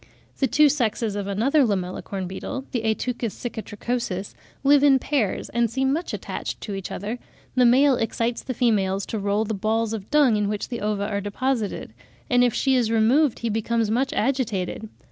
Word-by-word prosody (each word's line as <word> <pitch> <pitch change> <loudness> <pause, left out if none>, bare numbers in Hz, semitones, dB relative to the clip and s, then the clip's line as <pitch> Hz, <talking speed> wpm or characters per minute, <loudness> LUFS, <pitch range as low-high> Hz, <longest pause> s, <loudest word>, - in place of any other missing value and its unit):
The 270 - +3
two 300 +5 +5
sexes 230 -6 0
of 200 -1 -3
another 245 +9 +2
Lamellicorn 190 -2 -2
beetle, 225 +8 -5
the 240 - -1
Ateuchus 230 0 -1
cicatricosus, 220 -3 -4 0.3
live 285 0 +5
in 280 -2 +6
pairs, 260 -7 -1
and 235 0 +1
seem 265 +3 +1
much 335 +4 -2
attached - - -5
to 205 - -5
each 195 -1 -5
other; 215 +5 -4 0.3
the 250 -1 +5
male 265 +2 +5
excites 230 +1 -1
the 255 - -5
females 200 -5 +1
to 220 - -4
roll 205 +2 0
the 220 - -2
balls 220 +2 0
of 210 -2 -6
dung 280 -7 +4
in 205 -1 0
which 210 -1 -3
the 240 - -4
ova 205 -1 -1
are 200 -1 -2
deposited; 220 +2 -2 0.4
and 245 0 +5
if 245 - +3
she 270 - +2
is 240 -3 +2
removed, 230 +5 +3
he - - +1
becomes 225 0 0
much 260 +4 +1
agitated. 220 -5 -1
225 Hz, 185 wpm, -24 LUFS, 205-255 Hz, 0.4 s, in